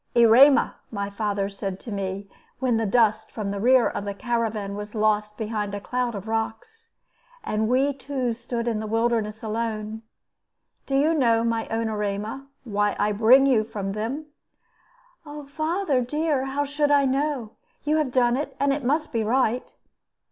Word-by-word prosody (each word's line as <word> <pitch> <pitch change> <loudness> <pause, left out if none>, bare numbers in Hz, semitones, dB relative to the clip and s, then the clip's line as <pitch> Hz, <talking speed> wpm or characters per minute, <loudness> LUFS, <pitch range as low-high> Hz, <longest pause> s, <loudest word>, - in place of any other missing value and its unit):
"Erema," 240 +4 +6
my 200 -2 -4
father 200 -1 -1
said 195 -1 -5
to 230 - -9
me, 195 0 -4 0.3
when 250 -3 +1
the 225 -1 0
dust 220 0 +2
from 205 -3 -4
the 200 - -3
rear 250 +3 +5
of - - -4
the 200 -1 -4
caravan 220 -2 -2
was 210 +2 -7
lost 210 -1 +1
behind 210 -2 -3
a - - -4
cloud 245 +2 -2
of 200 +1 -7
rocks, 225 - -4 0.5
and 215 +1 -1
we 270 +3 +2
two 265 -3 -3
stood 235 0 -4
in 225 -2 0
the 215 - -4
wilderness 225 -1 0
alone 220 -1 -3 0.9
"do 270 - -1
you 305 +4 +3
know, 230 -7 +3
my 230 -1 -1
own 225 0 -1
Erema, 210 +5 -3 0.2
why 205 -3 0
I 210 +1 +1
bring 230 +6 +6
you 250 -6 +3
from 205 -3 -5
them?" 230 +9 -3 1.2
"Father 310 -1 0
dear, 295 +1 0
how 280 +2 -1
should 290 +1 0
I 285 -1 +4
know? 270 -4 -1 0.3
You 300 +1 +1
have 300 -5 0
done 245 -1 +3
it, 290 +3 -4
and 280 0 +2
it 285 0 -3
must 300 +5 0
be 225 -1 +1
right." 245 +1 0
230 Hz, 170 wpm, -24 LUFS, 210-270 Hz, 1.2 s, Erema